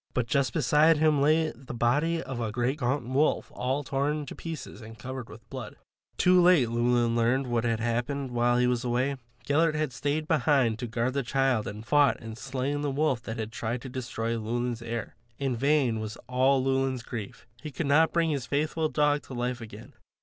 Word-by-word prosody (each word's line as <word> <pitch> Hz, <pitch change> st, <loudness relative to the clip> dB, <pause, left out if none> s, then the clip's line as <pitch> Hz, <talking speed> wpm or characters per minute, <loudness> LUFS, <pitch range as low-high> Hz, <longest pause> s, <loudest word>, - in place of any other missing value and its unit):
But 125 Hz, -, +1 dB
just 135 Hz, 0 st, +1 dB
beside 150 Hz, +2 st, +4 dB
him 150 Hz, -2 st, +3 dB
lay 155 Hz, +2 st, +3 dB
the 125 Hz, 0 st, -10 dB
body 150 Hz, +8 st, +1 dB
of 130 Hz, -2 st, -5 dB
a 115 Hz, -2 st, -2 dB
great 125 Hz, +6 st, -1 dB
gaunt 125 Hz, -1 st, -1 dB
wolf 135 Hz, +4 st, +1 dB
all 130 Hz, +3 st, -1 dB
torn 145 Hz, +2 st, -1 dB
to -, -, -8 dB
pieces 165 Hz, -6 st, -7 dB
and 115 Hz, 0 st, -11 dB
covered 130 Hz, +1 st, -7 dB
with 115 Hz, +1 st, -13 dB
blood. 130 Hz, -6 st, -7 dB, 0.4 s
Too 180 Hz, 0 st, +5 dB
late, 175 Hz, -9 st, +5 dB
Llewelyn 120 Hz, 0 st, +2 dB
learned 120 Hz, +4 st, +2 dB
what 120 Hz, -2 st, -1 dB
had 115 Hz, -1 st, 0 dB
happened 125 Hz, +4 st, -2 dB
while 120 Hz, 0 st, +2 dB
he 125 Hz, -, +3 dB
was 125 Hz, 0 st, 0 dB
away. 125 Hz, +3 st, 0 dB, 0.3 s
Gellert 155 Hz, +2 st, +2 dB
had 150 Hz, -4 st, -1 dB
stayed 145 Hz, +4 st, -2 dB
behind 135 Hz, -7 st, +2 dB
to 125 Hz, -, -3 dB
guard 120 Hz, +2 st, -1 dB
the 140 Hz, -, 0 dB
child 135 Hz, -3 st, +1 dB
and 105 Hz, +1 st, -6 dB
had -, -, -14 dB
fought 145 Hz, +1 st, +3 dB
and 115 Hz, -1 st, -8 dB
slain 135 Hz, +3 st, -3 dB
the 145 Hz, -, -1 dB
wolf 135 Hz, -3 st, 0 dB
that 110 Hz, 0 st, -6 dB
had 110 Hz, 0 st, -4 dB
tried 115 Hz, +1 st, -3 dB
to 130 Hz, -, -6 dB
destroy 115 Hz, -2 st, -3 dB
Llewelyn's 120 Hz, +1 st, -2 dB
heir. 115 Hz, -1 st, -5 dB, 0.2 s
In 135 Hz, -3 st, -1 dB
vain 135 Hz, -3 st, +2 dB
was 110 Hz, 0 st, -5 dB
all 130 Hz, +1 st, +3 dB
Llewelyn's 135 Hz, -2 st, 0 dB
grief; 110 Hz, -5 st, -7 dB, 0.2 s
he 155 Hz, -, -6 dB
could 145 Hz, +3 st, -4 dB
not 155 Hz, +3 st, +4 dB
bring 165 Hz, -2 st, +1 dB
his 140 Hz, -4 st, -3 dB
faithful 155 Hz, +2 st, 0 dB
dog 145 Hz, -1 st, +2 dB
to 130 Hz, -, -8 dB
life 125 Hz, 0 st, -2 dB
again. 110 Hz, -1 st, -10 dB
130 Hz, 205 wpm, -28 LUFS, 120-145 Hz, 0.4 s, Too